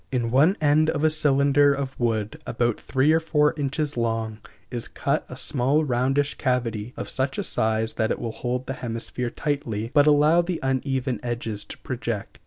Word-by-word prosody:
In 120 -3 -1
one 155 - +4
end 155 +1 +3
of 150 -1 -1
a 155 - +4
cylinder 145 -1 +3
of 135 -1 -4
wood, 110 -3 -1
about 120 -1 0
three 135 +3 +2
or 160 - +4
four 150 -2 +2
inches 145 0 -2
long, 115 -2 -2 0.3
is 120 -2 -4
cut - - -1
a - - -8
small 140 +4 +1
roundish 135 +3 0
cavity 120 -4 -1
of - - -4
such 135 +1 -2
a 205 - -1
size 110 -6 0
that 110 -2 0
it - - 0
will 115 - -4
hold 125 +2 -3
the 135 - -3
hemisphere 120 0 -3
tightly, 120 -7 -3
but 145 -1 +5
allow 150 +3 +5
the 175 0 -3
uneven 130 -2 -1
edges 115 -3 -4
to - - -9
project. - - -5
130 Hz, 185 wpm, -24 LUFS, 120-145 Hz, 0.3 s, but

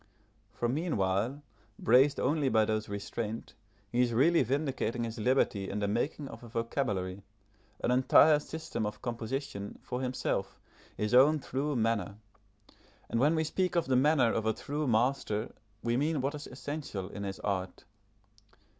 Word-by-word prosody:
For 120 - -2
meanwhile, 125 - 0 0.3
braced 135 +4 +4
only 145 +1 +1
by 110 -3 +4
those 110 0 -2
restraints, 105 +2 -5 0.4
he 120 - +2
is 120 -2 +2
really 160 +8 +4
vindicating 130 -3 -1
his 115 0 -5
liberty 105 -5 +1
in - - -3
the 105 -1 0
making 135 +7 -1
of - - -10
a - - -9
vocabulary, 105 -5 -2 0.6
an - - +2
entire 130 +4 +6
system 150 -8 -4
of 105 - -7
composition, 120 -3 -4
for 125 - -4
himself, 130 -1 -2 0.4
his 105 +1 -1
own 140 +5 +7
true 145 +1 -2
manner; 115 -3 0 1.0
and 115 - +1
when 150 +6 +4
we 160 - +1
speak 180 +4 -1
of 170 - +2
the 130 - +1
manner 130 -2 +4
of 110 -1 -1
a 110 - +3
true 145 +4 -3
master 115 -2 0 0.3
we 120 0 +1
mean 150 +2 +1
what 135 +3 -1
is 150 0 -7
essential 135 -7 -5
in 100 - -7
his 95 -1 -4
art. 95 -2 -3
125 Hz, 155 wpm, -31 LUFS, 110-145 Hz, 1.0 s, own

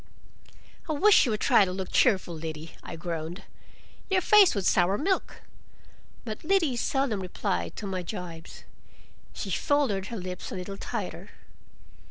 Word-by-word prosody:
"I - - +1
wish 390 +6 +6
you 240 - 0
would 215 - -2
try - - +5
to 185 - -1
look 190 0 -5
cheerful, 190 -7 +3
Liddy," 160 0 -7
I - - -8
groaned, 165 +3 -5 0.7
"your 380 -1 +3
face 410 - +6
would 195 -2 -1
sour 185 +2 +3
milk." 380 - -1 0.8
But 215 -2 -6
Liddy 330 -6 +2
seldom 255 -3 0
replied 85 - -3
to - - -6
my 190 -2 -3
gibes. 175 -3 -8 0.7
She - - -5
folded 260 - +1
her 230 - -5
lips 180 -1 -6
a - - -4
little 190 +2 -6
tighter. - - -5
195 Hz, 150 wpm, -27 LUFS, 175-270 Hz, 0.8 s, wish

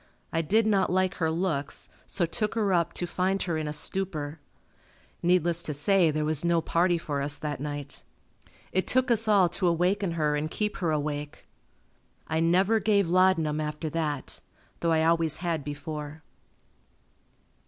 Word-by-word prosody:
I 165 - +2
did 215 +8 +2
not 200 -4 +2
like 185 0 +2
her 160 -3 +1
looks, 160 -4 -1 0.2
so 175 - 0
took 210 +6 -2
her 205 -4 +1
up 170 -1 +1
to 175 - -3
find 185 +2 0
her 170 -3 -2
in 155 -1 -2
a - - -2
stupor. 155 -1 -3 0.8
Needless 175 -1 +2
to 150 - -2
say 175 +3 +4
there 155 0 -1
was 155 0 -2
no 170 -1 +3
party 170 +2 +1
for 145 -4 -3
us 145 +1 0
that 150 -3 -4
night. 145 0 -6 0.7
It 185 - 0
took 255 0 +2
us 225 -1 +2
all 200 -4 +5
to 180 +2 0
awaken 180 +2 +1
her 150 -2 +1
and 150 +1 -2
keep 210 +4 -2
her 175 -4 -1
awake. 150 -1 -3 0.8
I 160 0 0
never 185 +7 +3
gave 200 -3 +2
laudanum 170 -4 +3
after 150 +1 -4
that, 150 -4 -3 0.4
though 170 - +1
I 160 -1 +3
always 165 -2 +3
had 165 -4 -2
before. 150 +1 -6
165 Hz, 165 wpm, -27 LUFS, 150-185 Hz, 0.8 s, all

